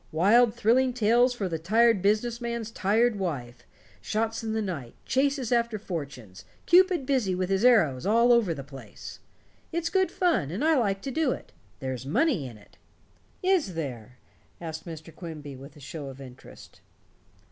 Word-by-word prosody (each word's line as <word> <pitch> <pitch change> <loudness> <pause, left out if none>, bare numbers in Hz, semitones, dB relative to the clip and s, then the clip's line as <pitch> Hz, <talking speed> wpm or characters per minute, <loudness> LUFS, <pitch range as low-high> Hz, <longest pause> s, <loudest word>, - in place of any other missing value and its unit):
Wild 215 +8 +4
thrilling 245 +3 +2
tales 240 +2 +3
for 200 -5 -2
the 165 -2 -3
tired 220 +4 +3
business 215 +4 +1
man's 235 -2 -4
tired 220 +2 +1
wife 130 -10 -4 0.4
shots 225 +1 -2
in 220 -1 -2
the 220 - 0
night, 155 - -6
chases 270 -2 0
after 235 -2 +1
fortunes, 140 - -7 0.2
Cupid 360 -4 +4
busy 250 -9 +1
with 185 +1 -2
his 195 +2 +1
arrows 165 - +4
all 230 +5 +4
over 230 -7 +3
the 140 - -7
place! 135 0 -11 0.5
It's 330 0 -2
good 375 0 +2
fun, 340 - +1
and 195 - -2
I 320 0 +4
like 200 -7 0
to 270 - -4
do 295 -1 +1
it. - - -11 0.3
There's 130 -2 -4
money 225 - +1
in 115 -3 -11
it." 105 - -21 0.7
"Is 360 - +1
there?" 125 -6 -6 0.4
asked 160 0 -7
Mr. 160 0 -9
Quimby 150 -5 -8
with 140 +2 -12
a - - -14
show 145 +1 -7
of 135 0 -9
interest. 130 -2 -13
205 Hz, 170 wpm, -27 LUFS, 155-240 Hz, 0.7 s, Wild